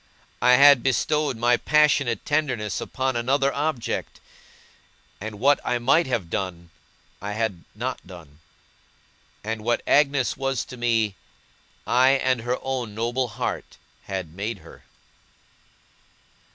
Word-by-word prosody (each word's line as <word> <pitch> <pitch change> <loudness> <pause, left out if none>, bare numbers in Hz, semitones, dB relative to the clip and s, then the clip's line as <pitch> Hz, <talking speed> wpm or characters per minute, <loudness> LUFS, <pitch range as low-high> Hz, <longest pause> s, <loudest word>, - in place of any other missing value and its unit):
I 125 - +5
had 140 0 +7
bestowed 135 +1 0
my 120 +1 +3
passionate 150 -5 +2
tenderness 130 -9 -1
upon 130 -1 -2
another 135 +4 +1
object; 145 -4 -3 1.0
and 105 0 -7
what 140 +4 +4
I 125 - 0
might 135 +7 +3
have 115 -9 -2
done, 85 -1 -5 0.5
I 100 +1 -4
had 110 -6 -2
not - - -5
done; 80 -5 -13 1.0
and 110 0 -4
what 120 +1 0
Agnes 140 -3 +2
was 135 -2 -2
to 130 - -10
me, 115 -4 +1 0.7
I 125 +4 +4
and 130 -3 +1
her 120 +2 -1
own 125 -5 -3
noble 120 +3 -1
heart 105 - -5 0.3
had 95 -5 -5
made 100 +4 -4
her. - - -15
120 Hz, 125 wpm, -24 LUFS, 105-135 Hz, 1.0 s, had